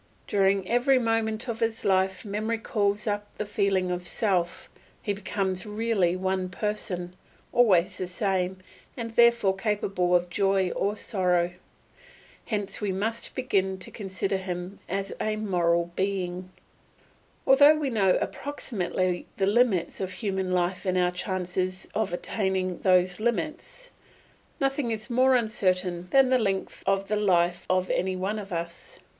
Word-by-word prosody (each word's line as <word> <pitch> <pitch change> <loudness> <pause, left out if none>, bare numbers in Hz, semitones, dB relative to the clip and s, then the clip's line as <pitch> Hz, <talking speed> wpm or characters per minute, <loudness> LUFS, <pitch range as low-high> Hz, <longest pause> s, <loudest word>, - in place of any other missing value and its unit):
During 195 -1 +2
every 250 +3 +3
moment 225 0 0
of 230 -2 -3
his 225 -1 -1
life 190 +1 +1
memory 215 +3 -2
calls 205 -2 0
up 205 -1 -2
the 210 - -2
feeling 200 -3 +1
of 180 0 -2
self; 180 -1 -1 0.3
he 205 - -2
becomes 190 -2 -2
really 210 -4 0
one 185 0 -1
person, 180 -3 -3 0.4
always 190 -6 +4
the 185 - -2
same, 185 0 -1 0.4
and 230 -2 -4
therefore 235 -4 +4
capable 195 -3 0
of 175 0 +2
joy 195 -1 +2
or 205 +2 -1
sorrow. 180 -4 +1 1.0
Hence 205 -3 -2
we 205 -2 0
must 220 +5 -2
begin 190 -7 0
to 185 - -9
consider 195 -2 -2
him 185 0 -5
as 195 +1 -2
a 215 0 0
moral 175 -5 +1
being. 185 -2 -2 1.0
Although 285 +3 +7
we 295 -3 -1
know 195 -5 +3
approximately 185 -10 -2
the 195 - +2
limits 205 -5 +2
of 185 -1 -3
human 190 -4 -2
life 180 0 0
and 185 -2 0
our 180 0 +3
chances 185 0 -3
of 215 -4 0
attaining 185 -1 -1
those 185 -1 +3
limits, 310 - -3 0.7
nothing 270 -2 0
is 220 +2 -4
more 255 +2 +4
uncertain 185 -6 0
than 270 -1 +5
the 255 - +5
length 195 -4 -2
of 195 0 +1
the 210 - 0
life 175 -4 +2
of 185 0 +1
any 185 +1 0
one 195 +4 -2
of 200 -1 -9
us. 170 0 -6
195 Hz, 145 wpm, -27 LUFS, 185-220 Hz, 1.0 s, Although